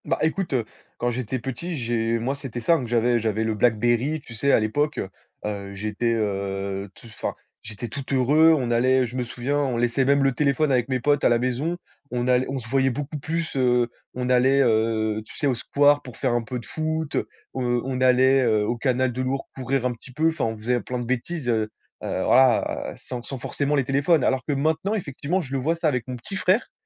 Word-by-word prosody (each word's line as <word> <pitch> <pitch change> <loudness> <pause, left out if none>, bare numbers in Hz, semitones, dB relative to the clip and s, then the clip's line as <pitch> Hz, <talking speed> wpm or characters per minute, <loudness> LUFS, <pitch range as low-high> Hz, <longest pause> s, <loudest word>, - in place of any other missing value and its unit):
Bah, 165 - 0
écoute, 160 +1 0
heu, 120 -4 +1 0.3
quand 120 - 0
j'étais 125 +1 -3
petit, 135 +8 -5
j'ai 115 -2 0
moi 120 +4 -1
c'était 135 -4 -6
simple, 135 0 +2
j'avais 120 +1 +2
j'avais 110 0 0
le 110 0 0
Blackberry, 120 +6 +2
tu 120 - -12
sais 140 +5 +1
à - - +5
l'époque, 145 +8 0
heu, 95 - -3 0.4
heu, 100 -1 -4
j'étais, 110 +3 -1
heu, 100 -2 -2
t - - -17
enfin, 115 - -5 0.3
j'étais 110 +2 -7
tout 140 +5 -6
heureux, 145 +5 +5
on 125 -4 -1
allait 130 +2 +3
je 120 +1 -8
me 125 - 0
souviens, 125 +4 -2
on 130 -4 0
laissait 120 +3 +1
même 140 +1 +3
le 135 - +4
téléphone 140 +2 +1
avec 125 -1 +1
mes 130 -1 0
potes 145 +4 +2
à - - +5
la 120 - +4
maison, 130 +8 -1 0.3
on 120 0 -2
all 125 0 +3
on 135 - -2
se 115 -4 -7
voyait 135 +2 +2
beaucoup 145 +3 -4
plus, 160 +2 -3
heu, 125 -2 +2 0.3
on 125 0 -2
allait, 130 +2 +4
heu, 110 -2 +1
tu 110 - -14
sais, 145 - -1
au 135 - +3
square 145 +4 +3
pour 125 -3 -11
faire 130 -3 0
un 120 - +1
peu 120 +3 -5
de 120 - -8
foot, 160 -1 -3
heu, - - -1 0.3
on 125 0 -1
allait, 130 +1 +5
heu, 110 -4 +2
au 120 +3 -1
canal 130 +1 +1
de 130 - -2
l'Ourq 135 +1 -2
courir 130 0 -1
un 125 - +1
petit 120 +3 -14
peu, 160 +5 +2
enfin 160 - -1
on 110 -1 -2
faisait 120 +3 0
plein 125 +4 -4
de 120 - -4
bêtises, 130 +4 -3
heu, 110 -2 +1 0.3
heu, 95 - -2
voilà, 130 -3 +3
sans 125 -2 -7
sans 135 +3 -6
forcément 140 +4 -1
les 140 - +2
téléphones. 140 +3 +2
Alors 130 0 +2
que 145 - +1
maintenant 160 +9 0
effectivement, 170 0 -2
je 135 -5 -9
le 135 - 0
vois 160 +6 +1
ça 165 -1 0
avec 125 -5 -1
mon 130 - -4
petit 160 +11 -6
frère, 190 +5 +1
125 Hz, 230 wpm, -24 LUFS, 115-140 Hz, 0.4 s, à